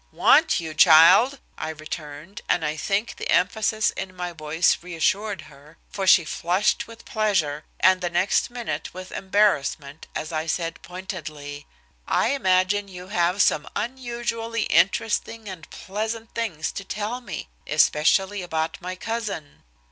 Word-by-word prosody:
"Want - - +4
you, 160 -2 -5
child!" 180 - +7 0.2
I - - -3
returned, 155 +2 -8
and 170 - +2
I 150 +1 -1
think 195 +7 -2
the - - -5
emphasis 215 +3 +2
in 190 -1 -6
my 180 -1 -4
voice 160 +1 +1
reassured 190 +3 -1
her, 150 +1 -17
for 195 -2 -3
she 180 -3 +7
flushed 185 +9 0
with 230 0 -13
pleasure, 185 -9 0
and 185 0 +4
the 175 - -1
next 175 +3 +1
minute 240 -6 -5
with 185 0 -8
embarrassment 160 -7 0
as 155 - -4
I 160 0 -2
said 165 0 -2
pointedly: 155 -6 -7 0.4
"I - - +2
imagine 200 -5 +2
you 180 -1 -10
have 180 0 +2
some 150 - +1
unusually 235 -2 -3
interesting 225 +2 +1
and 180 -5 -9
pleasant 220 +3 -5
things 190 -10 -2
to 200 - -6
tell 215 +5 -4
me, 185 - -7 0.2
especially 190 +6 +3
about 160 0 -3
my 185 0 -5
cousin." 210 -7 -5
185 Hz, 140 wpm, -24 LUFS, 160-210 Hz, 0.4 s, child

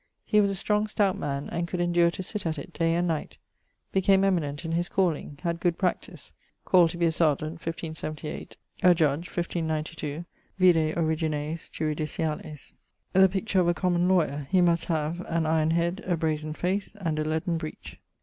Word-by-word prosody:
He 210 -1 +4
was 200 - +2
a 195 - -1
strong, 210 +2 +1
stout 205 -3 +1
man, 140 -1 -3
and 170 0 -2
could 180 - -4
endure 175 -1 +3
to 185 - -5
sit 205 -1 -4
at 160 -1 -2
it 165 +5 -8
day 165 0 +1
and 175 +1 +1
night[LIX.]; 160 -3 -3 0.5
became 195 0 +4
eminent 165 -5 0
in 165 - -3
his 175 +2 0
calling, 170 -6 0
had 170 -1 -1
good 170 -1 +1
practise; 185 -2 -3 0.3
called 175 -3 +5
to 170 - -6
be 170 - +2
a 165 - +3
Serjeant 160 0 +1
<1578>, 160 -2 -5 0.2
a 180 -1 +6
Judge 155 +1 +1
<1592>: 160 -2 -3 0.3
vide 165 -4 +4
Origines 160 -1 -1
Juridiciales. 155 0 -2
[LIX.] 150 -2 -11 0.4
The 190 0 +6
picture 195 +1 0
of 175 - +3
a 175 - +2
common 175 0 +1
law(y)er: 150 -6 +1
He 185 +3 +3
must 170 -1 +3
have 160 0 -1
'an 165 -1 0
iron 155 0 +2
head, 170 +3 0
a 175 -2 +1
brazen 155 -1 -1
face, 190 +6 -2
and 160 -5 -1
a - - +1
leaden 160 +2 -1
breech.' 155 -1 -8
170 Hz, 185 wpm, -27 LUFS, 155-180 Hz, 0.5 s, a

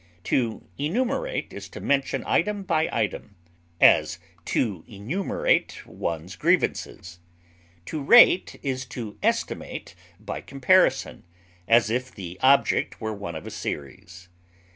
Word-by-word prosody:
To 115 -4 -1 0.2
enumerate 255 - -2
is - - -8
to - - -9
mention 140 -1 0
item 205 +3 0
by 160 -4 +1
item; - - -3 0.4
as, - - +5 0.3
to 100 -9 -1
enumerate 115 - -1
one's 85 +2 -5
grievances. 85 -1 -1 0.7
To 155 - -4
rate 185 - +6
is 130 -2 -2
to 115 -4 -7
estimate - - -2 0.3
by - - -6
comparison, 160 +8 +2 0.4
as 115 -1 +4
if 125 +2 -2
the 90 -1 -9
object 135 +1 +3
were 110 -1 -3
one 100 -5 -6
of 80 - -7
a - - -7
series. 85 +5 -7
125 Hz, 120 wpm, -25 LUFS, 95-155 Hz, 0.7 s, rate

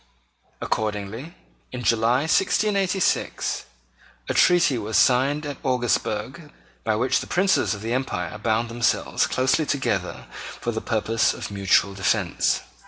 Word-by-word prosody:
Accordingly, 110 - -3 0.4
in 125 -1 -6
July 115 +3 +2
1686, 195 +3 0 0.6
a - - +1
treaty 175 -6 +4
was 110 +1 -1
signed 140 +4 +3
at 145 -2 -5
Augsburg 125 +3 -1 0.3
by - - +1
which - - +1
the - - -7
Princes 180 - +2
of 100 - -10
the 115 +1 -2
Empire 90 -10 -3
bound 115 +1 0
themselves 120 +1 0
closely 130 +4 +1
together 140 -2 -2 0.3
for 120 - -2
the 110 -1 -4
purpose 115 0 0
of - - -7
mutual 100 0 +2
defence. 95 -1 0
120 Hz, 125 wpm, -23 LUFS, 110-145 Hz, 0.6 s, treaty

